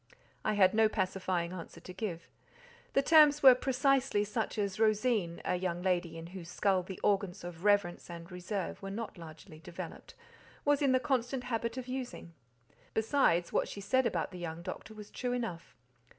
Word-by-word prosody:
I 215 Hz, -, +1 dB
had 190 Hz, -2 st, +5 dB
no 220 Hz, 0 st, +4 dB
pacifying 185 Hz, -3 st, -1 dB
answer 170 Hz, -1 st, -8 dB
to 180 Hz, +2 st, -10 dB
give. 180 Hz, -6 st, -5 dB, 0.7 s
The 275 Hz, -, +3 dB
terms 300 Hz, -1 st, +6 dB
were 260 Hz, -2 st, +11 dB
precisely 265 Hz, -3 st, +2 dB
such 215 Hz, +2 st, -3 dB
as 200 Hz, -1 st, -2 dB
Rosine—a 215 Hz, -6 st, +1 dB
young 175 Hz, -1 st, -2 dB
lady 175 Hz, -3 st, 0 dB
in 165 Hz, -, -7 dB
whose 175 Hz, -3 st, -8 dB
skull 190 Hz, +1 st, +2 dB
the 185 Hz, +1 st, -8 dB
organs 200 Hz, -2 st, +1 dB
of 175 Hz, 0 st, -8 dB
reverence 205 Hz, -5 st, +2 dB
and 170 Hz, +1 st, -9 dB
reserve 180 Hz, +1 st, -4 dB
were 195 Hz, -, -5 dB
not 205 Hz, -2 st, -6 dB
largely 155 Hz, -1 st, -11 dB
developed—was 290 Hz, -, -5 dB
in 275 Hz, -2 st, +3 dB
the 255 Hz, -, +4 dB
constant 255 Hz, -2 st, -1 dB
habit 230 Hz, 0 st, -2 dB
of 255 Hz, -1 st, -5 dB
using. 250 Hz, -9 st, -6 dB, 0.6 s
Besides, 220 Hz, -7 st, +2 dB
what -, -, +2 dB
she -, -, -7 dB
said 240 Hz, +6 st, +2 dB
about -, -, -2 dB
the 180 Hz, -, -8 dB
young 170 Hz, -1 st, -5 dB
doctor 220 Hz, +4 st, -7 dB
was 210 Hz, -1 st, -10 dB
true 250 Hz, -1 st, -2 dB
enough. 230 Hz, -9 st, -4 dB
205 Hz, 170 wpm, -32 LUFS, 175-245 Hz, 0.7 s, were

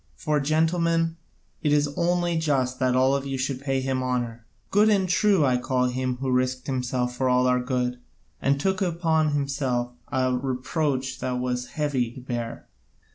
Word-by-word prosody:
For, 155 Hz, -3 st, 0 dB
gentlemen, 165 Hz, +2 st, +1 dB, 0.4 s
it 150 Hz, -, +1 dB
is 145 Hz, 0 st, +3 dB
only 175 Hz, 0 st, +1 dB
just 135 Hz, -5 st, 0 dB
that 130 Hz, -1 st, +2 dB
all 130 Hz, +2 st, +4 dB
of 140 Hz, 0 st, -2 dB
you 135 Hz, -1 st, -2 dB
should 130 Hz, 0 st, -2 dB
pay 135 Hz, -1 st, 0 dB
him 130 Hz, 0 st, -1 dB
honour. 120 Hz, -2 st, -2 dB, 0.3 s
Good 210 Hz, +2 st, +5 dB
and 195 Hz, -3 st, +3 dB
true 185 Hz, -3 st, +3 dB
I 125 Hz, -2 st, +3 dB
call 125 Hz, 0 st, 0 dB
him 130 Hz, 0 st, -2 dB
who 130 Hz, 0 st, -2 dB
risked 130 Hz, 0 st, 0 dB
himself 125 Hz, -2 st, -1 dB
for 130 Hz, 0 st, +1 dB
our 125 Hz, 0 st, +3 dB
good, 125 Hz, -1 st, -1 dB, 0.4 s
and 140 Hz, +1 st, +2 dB
took 190 Hz, +5 st, 0 dB
upon 165 Hz, -4 st, +1 dB
himself 135 Hz, -4 st, -1 dB, 0.2 s
a 130 Hz, -2 st, +1 dB
reproach 130 Hz, +1 st, -2 dB
that 130 Hz, 0 st, -2 dB
was 125 Hz, 0 st, -2 dB
heavy 140 Hz, -6 st, 0 dB
to -, -, -9 dB
bear." 120 Hz, -2 st, -5 dB
130 Hz, 170 wpm, -25 LUFS, 125-155 Hz, 0.4 s, Good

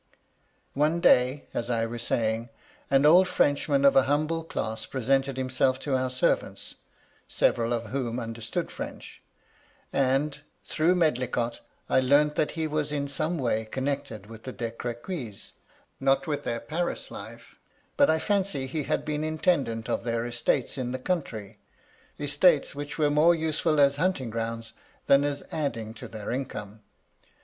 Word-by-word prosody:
One 155 Hz, +4 st, +2 dB
day, 130 Hz, -2 st, +4 dB
as 120 Hz, -, -2 dB
I 115 Hz, -2 st, +1 dB
was 115 Hz, +1 st, -5 dB
saying, 115 Hz, 0 st, -1 dB, 0.4 s
an 135 Hz, +1 st, +4 dB
old 180 Hz, +5 st, +7 dB
Frenchman 140 Hz, -3 st, +2 dB
of 140 Hz, -, +6 dB
a 135 Hz, -, +6 dB
humble 155 Hz, +3 st, +1 dB
class 110 Hz, -8 st, -4 dB
presented 135 Hz, +1 st, 0 dB
himself 130 Hz, 0 st, +1 dB
to 140 Hz, -2 st, 0 dB
our 130 Hz, 0 st, 0 dB
servants, 130 Hz, 0 st, 0 dB, 0.5 s
several 115 Hz, 0 st, +1 dB
of 115 Hz, -2 st, -2 dB
whom 125 Hz, -3 st, -2 dB
understood 115 Hz, -1 st, -4 dB
French; -, -, -8 dB, 0.7 s
and, 140 Hz, +2 st, +1 dB, 0.2 s
through 170 Hz, +4 st, +2 dB
Medlicott, 125 Hz, -7 st, 0 dB, 0.3 s
I -, -, +4 dB
learnt 145 Hz, +3 st, +4 dB
that 150 Hz, -, 0 dB
he 160 Hz, -, 0 dB
was 150 Hz, -1 st, -1 dB
in 140 Hz, -1 st, -1 dB
some 155 Hz, +5 st, -2 dB
way 115 Hz, -5 st, 0 dB
connected 130 Hz, -4 st, -3 dB
with 110 Hz, +1 st, -11 dB
the 130 Hz, -, -6 dB
De 115 Hz, -2 st, -4 dB
Crequys; 120 Hz, -, -6 dB, 0.5 s
not 135 Hz, 0 st, +2 dB
with 145 Hz, -2 st, -3 dB
their 115 Hz, 0 st, -2 dB
Paris 170 Hz, +3 st, -3 dB
life; -, -, -10 dB, 0.4 s
but 285 Hz, -, +5 dB
I 160 Hz, -, +4 dB
fancy 190 Hz, -6 st, 0 dB
he 145 Hz, +2 st, -3 dB
had -, -, -1 dB
been 150 Hz, 0 st, -2 dB
intendant 155 Hz, -8 st, 0 dB
of -, -, -1 dB
their 115 Hz, 0 st, -1 dB
estates 120 Hz, +2 st, 0 dB
in 125 Hz, -1 st, -2 dB
the -, -, -1 dB
country; 115 Hz, -, -3 dB, 0.6 s
estates 145 Hz, +2 st, +3 dB
which 145 Hz, -1 st, -6 dB
were 150 Hz, -2 st, +2 dB
more 160 Hz, +4 st, +5 dB
useful 160 Hz, -1 st, +1 dB
as 140 Hz, 0 st, +5 dB
hunting 150 Hz, -8 st, 0 dB
grounds 115 Hz, 0 st, -4 dB, 0.3 s
than 140 Hz, +1 st, +5 dB
as 145 Hz, -1 st, -2 dB
adding 115 Hz, -8 st, -3 dB
to 125 Hz, -, -9 dB
their 110 Hz, -2 st, -6 dB
income. 110 Hz, -5 st, -5 dB
135 Hz, 155 wpm, -27 LUFS, 120-150 Hz, 0.7 s, old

